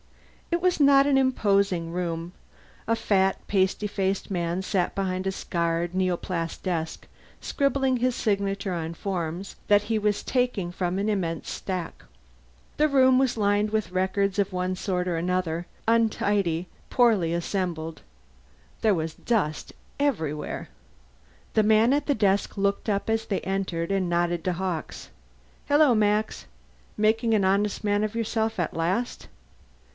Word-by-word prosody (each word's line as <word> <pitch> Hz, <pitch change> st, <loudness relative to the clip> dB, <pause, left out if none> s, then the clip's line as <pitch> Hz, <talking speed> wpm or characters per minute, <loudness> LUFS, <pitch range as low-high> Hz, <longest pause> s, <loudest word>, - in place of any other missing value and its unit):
It 340 Hz, -, +1 dB
was 365 Hz, -2 st, +2 dB
not 275 Hz, -1 st, +6 dB
an 280 Hz, -1 st, +3 dB
imposing 200 Hz, -9 st, +2 dB
room. 170 Hz, -1 st, -3 dB, 0.5 s
A 230 Hz, -, +2 dB
fat 195 Hz, -3 st, +2 dB
pasty 195 Hz, +1 st, +1 dB
faced 195 Hz, -1 st, -2 dB
man 175 Hz, 0 st, -1 dB
sat 185 Hz, -2 st, 0 dB
behind 185 Hz, -1 st, -2 dB
a -, -, +1 dB
scarred 170 Hz, -1 st, -2 dB
neoplast 180 Hz, -2 st, -2 dB
desk, 165 Hz, -4 st, -3 dB, 0.3 s
scribbling 275 Hz, -2 st, +1 dB
his 250 Hz, 0 st, +1 dB
signature 195 Hz, -2 st, -1 dB
on 165 Hz, -1 st, -4 dB
forms 180 Hz, 0 st, -4 dB
that 205 Hz, 0 st, +5 dB
he 220 Hz, +1 st, 0 dB
was 210 Hz, -1 st, 0 dB
taking 245 Hz, -9 st, 0 dB
from 180 Hz, 0 st, -2 dB
an 200 Hz, +2 st, -1 dB
immense 175 Hz, -6 st, -2 dB
stack. 185 Hz, -3 st, -5 dB, 0.7 s
The 305 Hz, -, +4 dB
room 260 Hz, -2 st, +5 dB
was 260 Hz, -3 st, +1 dB
lined 205 Hz, 0 st, +2 dB
with 215 Hz, -4 st, -1 dB
records 190 Hz, +2 st, 0 dB
of 200 Hz, -1 st, +1 dB
one 185 Hz, 0 st, -1 dB
sort 180 Hz, -1 st, -2 dB
or 175 Hz, -2 st, 0 dB
another, 175 Hz, -1 st, -1 dB, 0.2 s
untidy, 205 Hz, -6 st, +1 dB, 0.2 s
poorly 220 Hz, -9 st, +3 dB
assembled. 170 Hz, -2 st, -3 dB, 0.8 s
There 215 Hz, -3 st, +3 dB
was 160 Hz, -1 st, -3 dB
dust 195 Hz, -11 st, -1 dB, 0.3 s
everywhere. 160 Hz, -, -2 dB, 0.9 s
The 215 Hz, -, +4 dB
man 220 Hz, +4 st, +4 dB
at 290 Hz, 0 st, 0 dB
the 285 Hz, -, +2 dB
desk 200 Hz, -1 st, +1 dB
looked 200 Hz, +2 st, 0 dB
up 200 Hz, -1 st, 0 dB
as 225 Hz, 0 st, 0 dB
they 195 Hz, -, -1 dB
entered 190 Hz, -3 st, -2 dB
and 190 Hz, -2 st, 0 dB
nodded 175 Hz, -1 st, 0 dB
to 185 Hz, -, +1 dB
Hawkes. 175 Hz, -2 st, -4 dB, 0.6 s
"Hello, 290 Hz, -2 st, +5 dB
Max. 210 Hz, -, +1 dB, 0.5 s
Making 225 Hz, +2 st, +2 dB
an 200 Hz, -3 st, +2 dB
honest 200 Hz, +3 st, +1 dB
man 205 Hz, 0 st, +1 dB
of 215 Hz, +1 st, -3 dB
yourself 225 Hz, -2 st, -1 dB
at 170 Hz, -, -1 dB
last?" 185 Hz, +9 st, -2 dB
195 Hz, 145 wpm, -26 LUFS, 175-220 Hz, 0.9 s, not